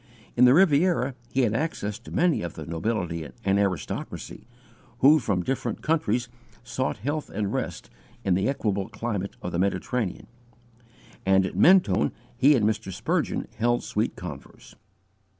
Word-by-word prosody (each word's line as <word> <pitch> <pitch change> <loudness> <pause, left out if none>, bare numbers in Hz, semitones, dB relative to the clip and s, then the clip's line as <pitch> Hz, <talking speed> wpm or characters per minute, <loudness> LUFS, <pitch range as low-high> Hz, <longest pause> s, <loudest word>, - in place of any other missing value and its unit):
In 125 - +6
the 125 +2 +7
Riviera, 160 -5 +3 0.2
he 135 - +2
had 115 -4 +2
access 110 -6 -2
to 120 - -13
many 175 -2 +2
of 85 -2 -5
the 80 - -7
nobility 85 -2 -2 0.2
and 100 +1 +3
aristocracy, 95 +2 -3 0.5
who 145 +6 +6
from 100 -8 -1
different 135 +7 -3
countries 150 -7 +1 0.4
sought 120 +2 -2
health 145 +8 -3
and 100 -1 -2
rest - - -4 0.3
in 95 - +2
the 95 +3 +1
equable 100 -8 -1
climate 105 -4 -4
of 90 - -3
the 85 - -2
Mediterranean, 100 +2 -1 1.0
and 95 0 +4
at - - -5
Mentone 140 - +5 0.2
he 135 +4 +5
and 110 -5 +2
Mr. 105 -3 -1
Spurgeon - - -1
held 120 +2 +1
sweet 110 +3 -1
converse. 75 -6 -10
110 Hz, 150 wpm, -26 LUFS, 95-135 Hz, 1.0 s, the